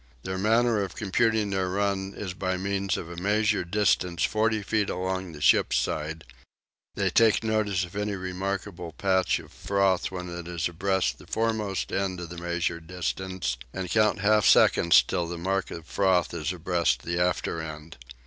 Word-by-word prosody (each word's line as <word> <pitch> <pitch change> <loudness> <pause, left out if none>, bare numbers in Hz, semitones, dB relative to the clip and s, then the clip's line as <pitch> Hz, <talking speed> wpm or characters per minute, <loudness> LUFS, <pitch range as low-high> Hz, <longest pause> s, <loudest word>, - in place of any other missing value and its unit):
Their 95 0 -3
manner 115 +1 +3
of 95 -3 -4
computing 110 0 +1
their 95 -1 0
run 100 0 -1
is 95 -3 -4
by 95 0 -2
means 100 0 -1
of 80 - -6
a 85 0 -9
measured 105 -1 +1
distance 90 -3 +2
of - - -3
40 110 -1 +1
feet 105 0 0
along 95 -1 -3
the 75 - -10
ship's - - +4
side: 80 +1 -2 0.7
they - - 0
take 115 -1 +4
notice 105 -4 0
of 90 - -14
any 105 0 -1
remarkable 95 -2 -4
patch 95 +1 +1
of - - -12
froth 100 -2 +1
when 90 -1 -6
it 85 -1 -7
is 85 -2 -1
abreast 90 -7 -1
the - - -15
foremost 110 -4 -1
end 95 -2 -1
of 85 -2 -7
the 85 0 -7
measured 85 -1 -2
distance, 90 -5 -3 0.2
and 95 -3 -4
count 105 0 +2
half 105 +1 +4
seconds 85 -1 +6
till 85 - -2
the 85 0 -5
mark 95 +2 -1
of 85 -1 -8
froth 95 -3 +1
is 85 +1 -2
abreast 85 -8 0
the 85 +1 -2
after 90 -2 0
end. 80 0 -8
95 Hz, 175 wpm, -27 LUFS, 85-100 Hz, 0.7 s, seconds